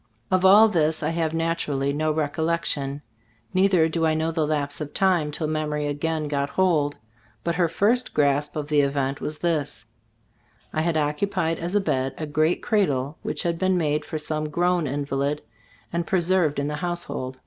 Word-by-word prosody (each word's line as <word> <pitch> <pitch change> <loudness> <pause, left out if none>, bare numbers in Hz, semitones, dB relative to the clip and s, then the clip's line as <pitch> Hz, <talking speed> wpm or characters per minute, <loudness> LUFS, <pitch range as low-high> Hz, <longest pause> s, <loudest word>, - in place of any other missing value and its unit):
Of 185 0 +3
all 205 +4 +8
this 160 -6 +1
I 155 - +1
have, 165 -1 -1
naturally, 165 -4 -1
no 155 +1 0
rec 150 -2 -1
ollection 150 -4 -1 0.2
— 110 0 -37
neither 185 -3 +4
do 165 0 -2
I 160 -1 +3
know 160 +1 0
the 160 -2 0
lapse 145 -1 -2
of 150 -1 -6
time 180 -6 +3
till 155 +2 -3
memory 150 -1 -1
again 155 +2 -2
got 140 -1 -1
hold; 155 -6 +1 0.5
but 170 - 0
her 175 0 +2
first 225 +9 +1
grasp 145 0 +1
of 150 -2 -3
the 150 -1 +3
event 140 0 -1
was 150 - -3
this: 150 -9 -2 0.9
I 155 - 0
had 165 0 +1
occupied 165 +3 0
as 175 +4 -3
a 205 - +4
bed 135 -7 -1
a 155 - -3
great 155 +3 +1
cradle 150 - 0
which - - -3
had 170 -1 -1
been 185 -1 +2
made 150 -2 0
for 155 - -5
some 155 0 -2
grown 175 0 +1
invalid, 140 +1 -2 0.5
and 170 -1 -1
preserved 180 -4 +2
in 140 0 -1
the 150 0 -3
household. 175 -7 -4
155 Hz, 185 wpm, -24 LUFS, 145-170 Hz, 0.9 s, all